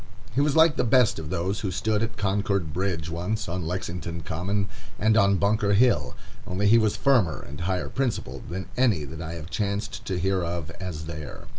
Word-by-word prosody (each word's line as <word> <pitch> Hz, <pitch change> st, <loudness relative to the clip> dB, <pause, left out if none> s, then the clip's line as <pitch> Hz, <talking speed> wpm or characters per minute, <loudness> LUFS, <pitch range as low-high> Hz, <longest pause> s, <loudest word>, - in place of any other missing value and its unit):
He 135 Hz, -, +2 dB
was 145 Hz, -1 st, +2 dB
like 160 Hz, -1 st, +6 dB
the -, -, +2 dB
best 125 Hz, -5 st, +4 dB
of 75 Hz, -2 st, -6 dB
those 95 Hz, +4 st, -1 dB
who 100 Hz, -, -2 dB
stood 105 Hz, +3 st, 0 dB
at 115 Hz, 0 st, -2 dB
Concord 100 Hz, -4 st, 0 dB
Bridge 90 Hz, -3 st, -1 dB
once, 100 Hz, +5 st, -2 dB
on 85 Hz, -1 st, -3 dB
Lexington 85 Hz, -1 st, -4 dB
Common, 95 Hz, +6 st, -1 dB, 0.3 s
and 110 Hz, +1 st, +3 dB
on 100 Hz, -2 st, +5 dB
Bunker 100 Hz, +1 st, +2 dB
Hill, 100 Hz, -, +3 dB, 0.3 s
only 95 Hz, +3 st, -1 dB
he 115 Hz, +3 st, +7 dB
was 110 Hz, -2 st, +2 dB
firmer 120 Hz, -, +2 dB
and 70 Hz, -, -8 dB
higher 90 Hz, +1 st, -1 dB
principled 115 Hz, -, -3 dB
than 95 Hz, +3 st, -4 dB
any 115 Hz, -11 st, +3 dB
that 75 Hz, +3 st, -8 dB
I 80 Hz, 0 st, -5 dB
have 80 Hz, -1 st, -8 dB
chanced 100 Hz, +3 st, -2 dB
to 95 Hz, -, -2 dB
hear 95 Hz, +1 st, +1 dB
of 85 Hz, -2 st, -3 dB
as 80 Hz, -5 st, -5 dB
there. 75 Hz, -2 st, -7 dB
95 Hz, 195 wpm, -26 LUFS, 85-105 Hz, 0.3 s, he